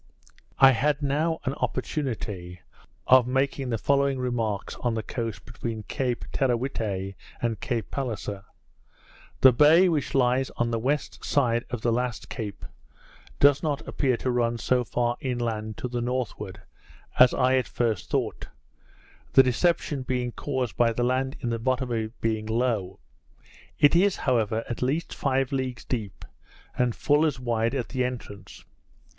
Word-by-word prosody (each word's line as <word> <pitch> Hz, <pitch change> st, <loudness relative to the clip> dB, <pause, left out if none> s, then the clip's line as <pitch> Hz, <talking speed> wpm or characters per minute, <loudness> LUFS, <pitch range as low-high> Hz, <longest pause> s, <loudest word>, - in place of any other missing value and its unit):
I 135 Hz, 0 st, +8 dB
had 145 Hz, +4 st, +1 dB
now 155 Hz, +4 st, +1 dB
an 135 Hz, -, 0 dB
opportunity 105 Hz, -, -3 dB, 0.4 s
of 130 Hz, -1 st, +6 dB
making 135 Hz, 0 st, 0 dB
the 115 Hz, -, 0 dB
following 140 Hz, +3 st, +2 dB
remarks 115 Hz, -5 st, -2 dB
on 120 Hz, -2 st, -1 dB
the 110 Hz, -, -2 dB
coast 115 Hz, -6 st, -5 dB
between 115 Hz, -2 st, -5 dB
Cape 125 Hz, +2 st, -2 dB
Teerawhitte 115 Hz, -7 st, -1 dB, 0.3 s
and 115 Hz, -2 st, -1 dB
Cape 120 Hz, -5 st, -3 dB
Palliser: 110 Hz, -7 st, -4 dB, 1.0 s
The 130 Hz, -1 st, +8 dB
bay 155 Hz, +8 st, +6 dB
which 150 Hz, -5 st, -1 dB
lies 130 Hz, 0 st, +2 dB
on 120 Hz, 0 st, 0 dB
the 115 Hz, -, 0 dB
west 140 Hz, +5 st, -2 dB
side 120 Hz, -4 st, +1 dB
of 125 Hz, -3 st, -4 dB
the 120 Hz, -, +1 dB
last 125 Hz, 0 st, -2 dB
Cape, 105 Hz, -5 st, -6 dB, 0.7 s
does 145 Hz, 0 st, +5 dB
not 150 Hz, -3 st, -2 dB
appear 130 Hz, -4 st, +1 dB
to 130 Hz, -, -1 dB
run 120 Hz, -1 st, +1 dB
so 125 Hz, +2 st, +1 dB
far 120 Hz, 0 st, -1 dB
inland 115 Hz, -4 st, -3 dB
to -, -, -3 dB
the 120 Hz, -1 st, -3 dB
northward 120 Hz, -6 st, -4 dB, 0.6 s
as 125 Hz, -1 st, +8 dB
I 130 Hz, 0 st, +3 dB
at 130 Hz, -, 0 dB
first 110 Hz, -6 st, -1 dB
thought; -, -, -2 dB, 0.9 s
the 135 Hz, -, +8 dB
deception 145 Hz, +2 st, +1 dB
being 125 Hz, -1 st, -2 dB
caused 130 Hz, -6 st, -3 dB
by 115 Hz, -1 st, +3 dB
the 120 Hz, -, -1 dB
land 130 Hz, +2 st, 0 dB
in 120 Hz, -3 st, -1 dB
the 115 Hz, -, -2 dB
bottom 130 Hz, +1 st, -1 dB
of 115 Hz, -, 0 dB
it 110 Hz, +2 st, -6 dB
being 110 Hz, -1 st, -1 dB
low: 110 Hz, -5 st, -1 dB, 0.8 s
It 145 Hz, -, +5 dB
is, 195 Hz, +3 st, +4 dB
however, 115 Hz, -4 st, 0 dB
at 120 Hz, -, -5 dB
least 145 Hz, +6 st, -1 dB
five 135 Hz, -1 st, 0 dB
leagues 130 Hz, -3 st, -3 dB
deep, 110 Hz, -6 st, -4 dB, 0.5 s
and 125 Hz, -2 st, +1 dB
full 150 Hz, +1 st, +3 dB
as 150 Hz, -5 st, 0 dB
wide 115 Hz, 0 st, 0 dB
at 125 Hz, -4 st, -2 dB
the 130 Hz, -2 st, -1 dB
entrance. 120 Hz, -5 st, -7 dB
125 Hz, 155 wpm, -26 LUFS, 115-135 Hz, 1.0 s, I